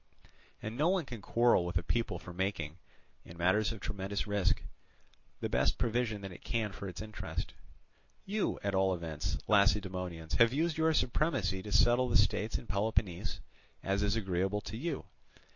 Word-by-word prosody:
And 110 Hz, +1 st, -4 dB
no 150 Hz, +7 st, +3 dB
one 185 Hz, -4 st, +1 dB
can 120 Hz, -5 st, -7 dB
quarrel 120 Hz, -3 st, +4 dB
with 90 Hz, 0 st, -1 dB
a 90 Hz, -, -1 dB
people 115 Hz, -1 st, -1 dB
for 90 Hz, 0 st, -10 dB
making, 90 Hz, -4 st, -2 dB, 0.4 s
in 85 Hz, -, -12 dB
matters 95 Hz, +5 st, +3 dB
of 115 Hz, -, -6 dB
tremendous 100 Hz, -1 st, -3 dB
risk, 100 Hz, -3 st, +1 dB, 0.8 s
the -, -, 0 dB
best -, -, +2 dB
provision 115 Hz, -3 st, 0 dB
that 95 Hz, -1 st, -6 dB
it 90 Hz, -, -12 dB
can 110 Hz, -3 st, -1 dB
for 100 Hz, +1 st, -7 dB
its 90 Hz, +2 st, -6 dB
interest. 110 Hz, -1 st, -5 dB, 0.7 s
"You, 205 Hz, +2 st, -1 dB
at 100 Hz, 0 st, 0 dB
all 95 Hz, -1 st, +3 dB
events, 80 Hz, -3 st, -3 dB
Lacedaemonians, 95 Hz, -5 st, +1 dB
have 115 Hz, +1 st, +6 dB
used 160 Hz, +3 st, +1 dB
your 160 Hz, 0 st, +3 dB
supremacy 120 Hz, -, +1 dB
to 105 Hz, -, -7 dB
settle 120 Hz, +4 st, +4 dB
the -, -, +5 dB
states 105 Hz, +1 st, +2 dB
in -, -, -9 dB
Peloponnese 100 Hz, -2 st, -1 dB, 0.4 s
as 100 Hz, +1 st, +1 dB
is 100 Hz, +1 st, +2 dB
agreeable 95 Hz, -1 st, 0 dB
to 110 Hz, -, -7 dB
you. 150 Hz, +5 st, -3 dB
105 Hz, 170 wpm, -33 LUFS, 95-115 Hz, 0.8 s, have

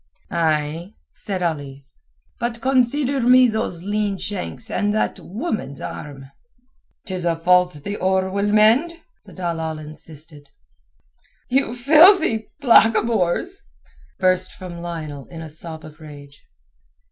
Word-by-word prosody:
"Ay," 160 Hz, +3 st, -1 dB, 0.2 s
said 190 Hz, -3 st, -4 dB
Ali, 140 Hz, -5 st, -4 dB, 0.5 s
"but 235 Hz, 0 st, -3 dB
consider 265 Hz, +2 st, +1 dB
me 250 Hz, +1 st, +6 dB
those 220 Hz, -6 st, -3 dB
lean 205 Hz, 0 st, -1 dB
shanks 205 Hz, +4 st, -6 dB
and 205 Hz, 0 st, 0 dB
that 215 Hz, -, -1 dB
woman's 215 Hz, -, -5 dB
arm." 135 Hz, -2 st, -8 dB, 0.7 s
"'Tis 185 Hz, -4 st, -4 dB
a 170 Hz, -1 st, +1 dB
fault 180 Hz, +2 st, +3 dB
the 200 Hz, +4 st, -4 dB
oar 190 Hz, 0 st, +1 dB
will 200 Hz, +1 st, 0 dB
mend," 225 Hz, +11 st, +4 dB, 0.3 s
the -, -, -14 dB
dalal 165 Hz, -3 st, -3 dB
insisted. 150 Hz, -1 st, -13 dB, 1.0 s
"You 255 Hz, -2 st, +1 dB
filthy 300 Hz, -, +5 dB
blackamoors!" 230 Hz, -, +3 dB, 0.6 s
burst 185 Hz, 0 st, +1 dB
from 180 Hz, -2 st, -9 dB
Lionel 155 Hz, -5 st, -6 dB
in 165 Hz, -1 st, -9 dB
a 155 Hz, -, -10 dB
sob 160 Hz, 0 st, -6 dB
of 155 Hz, +1 st, -13 dB
rage. 145 Hz, -2 st, -13 dB
185 Hz, 120 wpm, -21 LUFS, 160-225 Hz, 1.0 s, me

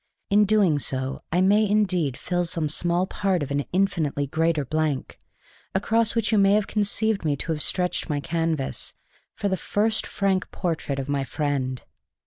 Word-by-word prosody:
In 205 Hz, -, +5 dB
so 210 Hz, -, +6 dB
doing 145 Hz, -10 st, +1 dB
I 175 Hz, +2 st, +2 dB
may 205 Hz, +2 st, +4 dB
indeed 185 Hz, -10 st, +1 dB
fill 175 Hz, -1 st, -1 dB
some 165 Hz, -2 st, -1 dB
small 175 Hz, +4 st, +1 dB
part 190 Hz, -4 st, 0 dB
of 140 Hz, -, -6 dB
an 145 Hz, 0 st, 0 dB
infinitely 165 Hz, -7 st, 0 dB
greater 160 Hz, +1 st, 0 dB
blank, 155 Hz, 0 st, -2 dB, 0.6 s
across 225 Hz, +4 st, +1 dB
which 230 Hz, -1 st, +1 dB
you 215 Hz, -, +4 dB
may 200 Hz, +1 st, +5 dB
conceive 210 Hz, 0 st, 0 dB
me 150 Hz, -3 st, +1 dB
to 165 Hz, -, -4 dB
have 155 Hz, -1 st, -2 dB
stretched 180 Hz, 0 st, 0 dB
my 145 Hz, -1 st, 0 dB
canvas 160 Hz, -2 st, -2 dB, 0.4 s
for 205 Hz, -, -2 dB
the 190 Hz, -1 st, 0 dB
first 215 Hz, +4 st, 0 dB
frank 195 Hz, -2 st, 0 dB
portrait 160 Hz, -6 st, -2 dB
of 135 Hz, 0 st, -3 dB
my 140 Hz, -1 st, 0 dB
friend. 135 Hz, -2 st, -2 dB
170 Hz, 165 wpm, -25 LUFS, 145-200 Hz, 0.6 s, so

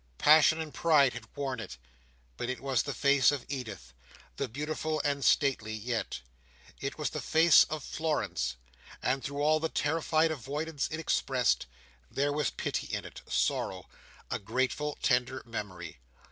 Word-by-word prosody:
Passion 155 Hz, +1 st, +6 dB
and 155 Hz, -2 st, -5 dB
pride 150 Hz, -6 st, +4 dB
had 120 Hz, -3 st, -8 dB
worn 135 Hz, -4 st, -3 dB
it, 95 Hz, -, -7 dB, 0.6 s
but 120 Hz, -, -4 dB
it 130 Hz, -, -3 dB
was 135 Hz, -1 st, +1 dB
the 140 Hz, -, -4 dB
face 140 Hz, -2 st, +4 dB
of 145 Hz, -3 st, -4 dB
Edith, 110 Hz, -, -6 dB, 0.5 s
and -, -, -2 dB
beautiful 155 Hz, +3 st, -2 dB
and 140 Hz, -1 st, 0 dB
stately 130 Hz, -8 st, +2 dB
yet. 115 Hz, -, -3 dB, 0.6 s
It 140 Hz, -, -4 dB
was 150 Hz, -, -2 dB
the -, -, -4 dB
face 160 Hz, 0 st, +6 dB
of 155 Hz, -2 st, -5 dB
Florence, 155 Hz, -, -2 dB, 0.5 s
and 130 Hz, +1 st, 0 dB
through 145 Hz, +1 st, -3 dB
all 155 Hz, +1 st, +4 dB
the 160 Hz, +1 st, -1 dB
terrified 160 Hz, +1 st, +1 dB
avoidance 145 Hz, +2 st, -3 dB
it 155 Hz, -, -4 dB
expressed, 130 Hz, -, +1 dB, 0.4 s
there 145 Hz, +1 st, 0 dB
was 150 Hz, -2 st, +1 dB
pity -, -, -3 dB
in -, -, -3 dB
it, -, -, -10 dB
sorrow, -, -, -1 dB, 0.4 s
a -, -, -1 dB
grateful 130 Hz, +7 st, -1 dB
tender 125 Hz, +1 st, +1 dB
memory. 105 Hz, -, -6 dB
140 Hz, 155 wpm, -30 LUFS, 125-155 Hz, 0.6 s, Passion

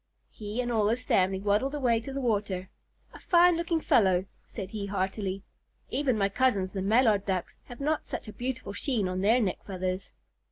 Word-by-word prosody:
He 215 Hz, +3 st, -4 dB
and 245 Hz, -1 st, -2 dB
all 220 Hz, -3 st, +2 dB
of -, -, +3 dB
his 240 Hz, +3 st, -1 dB
family 190 Hz, -4 st, +2 dB
waddled 210 Hz, +8 st, +1 dB
away 245 Hz, -5 st, +2 dB
to 255 Hz, +4 st, -7 dB
the 275 Hz, -, -3 dB
water. 205 Hz, -6 st, -1 dB, 0.4 s
"A -, -, -11 dB
fine 355 Hz, -1 st, +5 dB
looking 335 Hz, 0 st, 0 dB
fellow," 190 Hz, -, +3 dB, 0.2 s
said 195 Hz, -4 st, -7 dB
he 205 Hz, -2 st, -4 dB
heartily. 195 Hz, 0 st, -2 dB, 0.5 s
"Even 270 Hz, -5 st, +1 dB
my 195 Hz, -1 st, +2 dB
cousins, 200 Hz, -4 st, +1 dB
the 195 Hz, -, -2 dB
Mallard 215 Hz, 0 st, +3 dB
Ducks, 185 Hz, -3 st, -2 dB
have 245 Hz, -, -11 dB
not 300 Hz, +2 st, -1 dB
such -, -, -5 dB
a 215 Hz, -, -8 dB
beautiful 245 Hz, -5 st, -4 dB
sheen 220 Hz, -3 st, -1 dB
on 185 Hz, 0 st, -2 dB
their 220 Hz, +5 st, +4 dB
neck 200 Hz, -6 st, -1 dB
feathers." 185 Hz, -1 st, -4 dB
210 Hz, 195 wpm, -28 LUFS, 195-255 Hz, 0.5 s, fine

